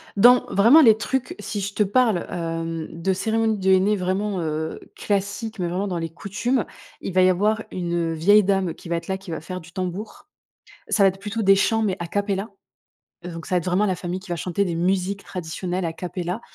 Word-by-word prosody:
Dans 245 +5 +6
vraiment 235 +11 +7
les 220 -5 +7
trucs, 265 +8 -2
si 205 -2 -4
je 200 +1 -4
te 210 - +3
parle 215 -2 +2
hem, 165 -1 -3
de 170 +4 -1
cérémonies 220 +2 0
de 190 0 +2
henné 190 +3 +4
vraiment, 190 +1 -1
heu, 160 0 -3 0.2
classiques. 205 +2 -2
Mais 175 - 0
vraiment 190 +4 -2
dans 180 -2 -2
les 165 0 -3
coutumes, 210 +8 -2 0.4
il 190 - -5
va 185 - +4
y 185 - +6
avoir 210 +4 +1
une 170 -2 -1
vieille 205 +7 +5
dame 195 -3 +1
qui - - -12
va 170 - 0
être 170 0 -5
là, 190 0 -1
qui 195 -1 -13
va 160 - -4
faire 185 +3 -6
du 165 +2 -15
tambour. 185 +3 -5 0.6
Ça 200 - +3
va - - +7
être 190 +1 -8
plutôt 210 +2 -3
des 195 -1 +6
chants, 225 +3 +2
mais 195 -3 0
a 170 - -4
cappella. 200 +2 -2 0.8
Heu, - - -5
donc 165 -1 -8
ça 180 - 0
va - - +5
être 170 - -5
vraiment 185 +3 +2
la 185 -2 0
famille 180 +1 -4
qui 190 -1 -14
va 175 - -1
chanter 180 +4 -1
des 170 -3 -2
musiques 190 +3 0
traditionnelles 180 +1 -4
a 165 - -1
cappella, 180 +4 -4
190 Hz, 225 wpm, -23 LUFS, 175-205 Hz, 0.8 s, vraiment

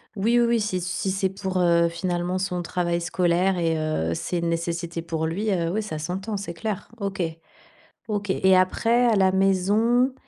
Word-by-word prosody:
Oui, 225 +4 +2
oui, 235 - +4
oui, 235 -1 +2
si 205 -3 -1
c 175 - -4
si 190 +1 -1
c'est 190 0 0
pour, 190 -1 -4
heu, 170 -1 +4
finalement 175 +1 -2
son 180 -2 -2
travail 175 0 -1
scolaire 180 +1 +1
et 165 -1 +1
heu, 155 - -1
c'est 175 - -2
une 170 - -1
nécessité 170 0 -3
pour 160 -1 -2
lui, 200 +6 -1
heu, 170 -3 0
ouais, 215 +5 -1
ça 155 -7 -5
s'entend, 190 +7 -4
c'est 195 -3 -5
clair. 210 +2 -4
OK. 195 -2 -3 0.9
OK, 205 -2 -2
et 190 0 +4
après, 230 +6 +3
à 230 -2 +3
la 190 -1 +4
maison, 205 +7 +2
185 Hz, 195 wpm, -24 LUFS, 170-205 Hz, 0.9 s, oui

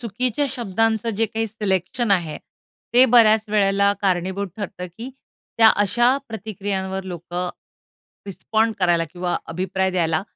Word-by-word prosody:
चुकीच्या 250 +4 -1
शब्दांचं 225 -2 0
जे 225 - +2
काही 225 +1 -2
सिलेक्शन 205 +1 -2
आहे. 170 -5 +1 0.6
ते 250 +2 +8
बऱ्याच 220 -3 +5
वेळेला 200 -1 +2
कारणीभूत 190 +1 -1
ठरतं 185 -3 -6
की 240 - -6 0.5
त्या 225 -1 +8
अशा 240 +6 +3
प्रतिक्रियांवर 195 -3 -4
लोकं 175 0 -5 0.8
रिस्पॉन्ड 220 +3 -1
करायला 175 -3 +2
किंवा 175 0 -2
अभिप्राय 190 +2 -1
द्यायला 165 -2 0
200 Hz, 120 wpm, -21 LUFS, 185-225 Hz, 0.8 s, ते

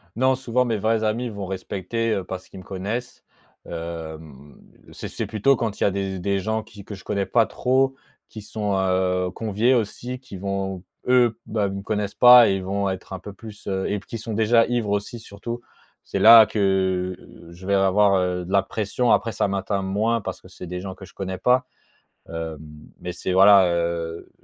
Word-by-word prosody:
Non, 130 +3 +3
souvent. 125 -1 0
mes 115 -3 0
vrais 110 +2 +1
amis 115 +3 -1
vont 100 -3 -6
respecter. 95 +4 -3
heu, 95 - -2
parce 95 0 -7
qu'ils - - -11
me - - -11
connaissent, 105 +7 -5 0.4
hem, 80 -4 -8 0.4
c'est - - -7
c'est - - -4
plutôt 120 +6 +2
quand 115 -4 -3
il - - +1
y - - +4
a - - +1
des 95 -1 -3
des 100 +2 0
gens 110 +2 -2
qui 110 -2 -13
que 105 - -7
je 95 - -14
connais 100 -2 -1
pas 115 +1 +3
trop, 130 +3 +1 0.3
qui 110 - -9
sont, 105 -1 -3
heu, 95 -1 +1
conviés 110 +4 +1
aussi, 125 +2 -2
qui 125 -7 -10
vont, 95 -1 -3 0.2
eux, 125 -3 +3
bah, 105 -2 -1
ils 95 - -4
me 100 - -5
connaissent 105 -1 -3
pas, 125 -2 +8
et 95 - +2
ils 95 - -4
vont 100 +1 -1
être 95 0 -6
un 95 - -5
peu 100 +2 -9
plus, 105 0 -12
heu 95 -1 -1
et 105 - -1
puis - - -20
qui 115 - -5
sont 110 0 -6
déjà 115 +2 +4
ivres 120 -4 -1
aussi, 105 +4 -2
surtout. 115 +3 -7 0.4
C'est - - -3
là, 115 0 +10
que, 95 -3 0
heu, 85 - -16
je 90 +3 -11
vais 100 - +1
avoir, 100 +1 +4
heu, 90 -1 0
de 90 - -8
la 100 0 +3
pression, 110 +4 -1
après 115 - +2
ça - - 0
m'atteint 100 0 -1
moins, 110 +4 0
parce - - -6
que - - -15
c'est 90 - -10
des 90 +1 -5
gens 95 0 -7
que 95 - -13
je 90 - -18
connais 95 -1 -5
pas, 125 +6 +2 0.6
hem, 80 -1 -5 0.4
mais 90 - -5
c'est, 95 - -3
voilà, 95 0 +7
heu, 85 -1 -2
100 Hz, 215 wpm, -23 LUFS, 95-115 Hz, 0.6 s, là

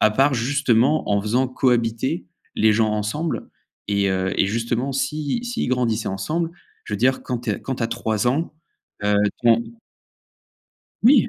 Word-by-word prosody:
à 110 - +5
part 135 +6 +3
justement 130 +2 +2
en 100 0 +3
faisant 125 +5 +1
cohabiter, 115 -6 0 0.3
les 110 0 +4
gens 110 0 +2
ensemble 105 +10 -2 0.4
et 100 -1 +2
heu, 95 0 0
et - - +3
justement 115 +5 -1
si 150 - -2
s'ils 240 - -2
grandissaient 120 -3 0
ensemble. 155 - -2 0.3
Je - - -8
veux - - 0
dire 130 +5 +2
quand 125 -2 -2
tu - - -3
es - - -2
quand 130 - -3
tu - - -4
as - - +2
3 115 -2 -1
ans, 155 +7 -1 0.5
heu, 105 0 +3 0.3
ton 115 -1 +5 1.4
Oui! 245 +1 +6
120 Hz, 165 wpm, -22 LUFS, 110-135 Hz, 1.4 s, Oui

